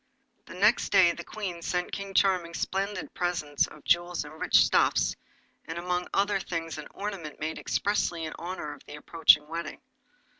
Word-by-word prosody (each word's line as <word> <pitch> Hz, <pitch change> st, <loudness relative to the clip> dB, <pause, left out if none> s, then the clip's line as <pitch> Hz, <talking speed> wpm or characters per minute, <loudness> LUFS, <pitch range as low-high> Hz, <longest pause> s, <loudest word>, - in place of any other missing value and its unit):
The -, -, -10 dB
next 210 Hz, +5 st, +3 dB
day 175 Hz, -2 st, +6 dB
the 170 Hz, -, -7 dB
Queen 185 Hz, -5 st, -5 dB
sent 180 Hz, +1 st, -2 dB
King 195 Hz, -1 st, -6 dB
Charming 180 Hz, -4 st, +2 dB
splendid 195 Hz, +2 st, -3 dB
presents 165 Hz, -5 st, 0 dB
of 155 Hz, -, -15 dB
jewels 175 Hz, -1 st, +1 dB
and 155 Hz, +2 st, -12 dB
rich -, -, +1 dB
stuffs, -, -, +2 dB, 0.5 s
and 165 Hz, -, -6 dB
among 180 Hz, +1 st, -2 dB
other 200 Hz, 0 st, +1 dB
things 165 Hz, -4 st, -4 dB
an 150 Hz, -, -8 dB
ornament 195 Hz, -7 st, -5 dB
made 155 Hz, +1 st, -3 dB
expressly 175 Hz, -5 st, 0 dB
in 155 Hz, -, -5 dB
honour 170 Hz, -4 st, -5 dB
of 145 Hz, -, -15 dB
the -, -, -8 dB
approaching 150 Hz, -1 st, +4 dB
wedding. 165 Hz, 0 st, -5 dB
175 Hz, 165 wpm, -28 LUFS, 160-190 Hz, 0.5 s, day